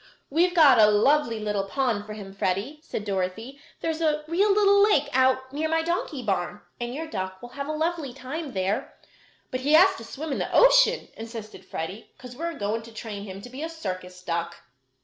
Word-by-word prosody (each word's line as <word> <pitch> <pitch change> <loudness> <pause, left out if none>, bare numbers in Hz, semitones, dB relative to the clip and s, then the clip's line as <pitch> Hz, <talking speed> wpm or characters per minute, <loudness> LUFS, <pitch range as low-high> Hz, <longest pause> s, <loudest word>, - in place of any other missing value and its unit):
"We've 350 +4 +2
got 285 -8 +7
a 215 - +8
lovely 230 +2 +3
little 210 -2 -1
pond 215 -2 -1
for 215 - -6
him, 200 -2 -9
Freddie," 195 +10 -2
said 265 -9 -5
Dorothy. 205 +7 -3 0.2
"There 330 - 0
is 320 +1 -5
a 305 -2 +1
real 385 +6 +3
little 400 0 +5
lake 300 -9 +4
out 260 0 +2
near 310 +2 -1
my 325 0 +1
donkey 325 -5 -2
barn, 195 -1 -2 0.2
and 240 0 -3
your 305 +6 -4
duck 190 -9 -5
will 245 - -10
have 280 +3 -6
a - - -2
lovely 315 -2 -1
time 270 +4 -6
there." 190 +1 -2 0.5
"But 255 - -2
he 285 +4 +1
has 375 +4 +7
to - - -9
swim 290 +7 -6
in - - -1
the - - -3
ocean," - - +5
insisted 225 -4 -8
Freddie, 185 +5 -6
"'cause 250 -1 -11
we're 335 +4 -4
going 215 +2 -1
to 230 +1 -12
train 210 -2 -7
him 195 -1 -8
to 245 - -9
be 265 +3 -7
a 325 - -3
circus 185 - -6
duck." 170 -1 -2
255 Hz, 210 wpm, -26 LUFS, 205-315 Hz, 0.5 s, a